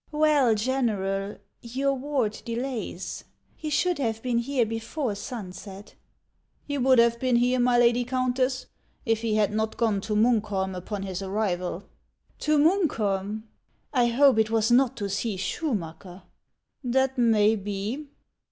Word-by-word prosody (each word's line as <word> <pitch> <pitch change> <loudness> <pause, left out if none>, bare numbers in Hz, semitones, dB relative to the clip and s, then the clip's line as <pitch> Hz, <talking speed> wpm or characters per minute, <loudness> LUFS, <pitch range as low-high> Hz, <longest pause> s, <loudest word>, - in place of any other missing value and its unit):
" - - -35
Well, 280 -7 +4
General, 210 -5 -1 0.2
your 270 +4 -1
ward 265 -5 -2
delays. 230 -6 -4 0.3
He 310 - -5
should 350 +2 +1
have 225 -4 -2
been 245 -2 +1
here 245 0 +1
before 225 +3 -3
sunset." 200 -2 -8 0.4
" - - -44
He 285 -1 -2
would 260 0 +4
have 235 0 +4
been 255 -2 +1
here, 250 +1 +3
my 245 0 +3
lady 240 0 +4
Countess, 255 +1 0 0.4
if 225 -2 +1
he 225 -2 0
had 210 -1 +2
not 220 0 -1
gone 220 -4 +1
to 210 +1 -2
Munkholm 210 -4 +1
upon 195 +2 -5
his 190 -1 -4
arrival." 190 -2 -2 0.3
" - - -40
To 305 0 +2
Munkholm! 220 - +1 0.5
I 245 -3 +3
hope 255 0 +4
it 220 0 +2
was 225 +1 +1
not 255 0 +4
to 205 -3 -2
see 200 +1 -2
Schuruacker 185 - -4 0.2
?" - - -53
" - - -52
That 265 -1 +2
may 220 -2 +4
be." 205 +8 -4
230 Hz, 155 wpm, -26 LUFS, 205-255 Hz, 0.5 s, Well